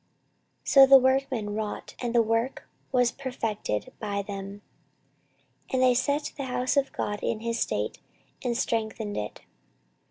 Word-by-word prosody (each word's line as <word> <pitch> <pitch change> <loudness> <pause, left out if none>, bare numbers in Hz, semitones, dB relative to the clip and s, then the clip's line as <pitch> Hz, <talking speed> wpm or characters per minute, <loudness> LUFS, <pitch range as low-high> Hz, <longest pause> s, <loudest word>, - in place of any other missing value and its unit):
14:024:013 - - -16
So 275 -2 +9
the 270 0 +10
workmen 260 -5 +1
wrought, 215 -1 -4
and 240 -1 -2
the 235 - +6
work 230 +4 -1 0.2
was 250 -2 +3
perfected 225 - -3
by 200 -2 -2
them, 200 0 -7 1.1
and 260 - +1
they 255 -1 +5
set 285 +4 0
the 275 - -3
house 255 +1 -1
of 275 -1 +2
God 205 0 -3
in 220 - -2
his 230 0 -2
state, - - -1 0.4
and 240 -2 0
strengthened 220 -2 -2
it. 105 - -5
235 Hz, 150 wpm, -27 LUFS, 210-260 Hz, 1.1 s, the